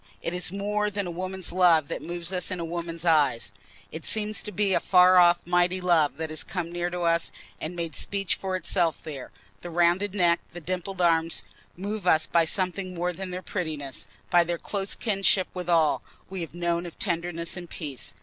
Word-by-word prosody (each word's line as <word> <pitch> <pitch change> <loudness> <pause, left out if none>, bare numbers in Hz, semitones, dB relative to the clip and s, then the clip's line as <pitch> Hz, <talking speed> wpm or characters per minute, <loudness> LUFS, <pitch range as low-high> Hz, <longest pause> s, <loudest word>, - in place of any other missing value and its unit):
It 170 - -3
is 180 0 0
more 210 +1 -1
than 200 -1 -3
a 175 - -4
woman's 185 +1 -3
love 170 -4 +4
that - - -4
moves 175 +1 -5
us 180 -1 0
in 185 -2 -3
a 170 - -3
woman's 170 0 -4
eyes—it 140 -2 -1
seems 215 0 +2
to 210 - -6
be 200 0 +1
a - - +4
far 185 0 +6
off 175 0 +6
mighty 175 +1 +2
love 165 -6 +2
that 160 0 -4
has 155 - -1
come 175 -2 -4
near 175 0 -2
to 175 0 -4
us, 170 -1 +2 0.3
and 165 +3 -5
made 165 -3 -3
speech 195 -2 0
for 190 -1 -3
itself 175 -3 0
there; 140 -5 -7 0.3
the 175 - -7
rounded 175 +4 +2
neck, 175 -3 +3
the 175 - -6
dimpled 185 +2 -4
arm, 165 -1 +3 0.5
move 200 +1 -4
us 160 -2 +5
by 170 -1 +3
something 185 +1 -1
more 175 +1 -1
than 190 +2 -6
their 180 +1 -5
prettiness—by 150 - -1
their 170 0 -2
close 195 +2 -2
kinship 195 -3 +2
with 180 -1 -5
all 165 -3 +3 0.3
we 190 -2 -4
have 165 0 -7
known 170 0 -1
of 170 - -11
tenderness 170 -2 -2
and 175 -2 -8
peace. 125 - -5
175 Hz, 200 wpm, -26 LUFS, 165-185 Hz, 0.5 s, far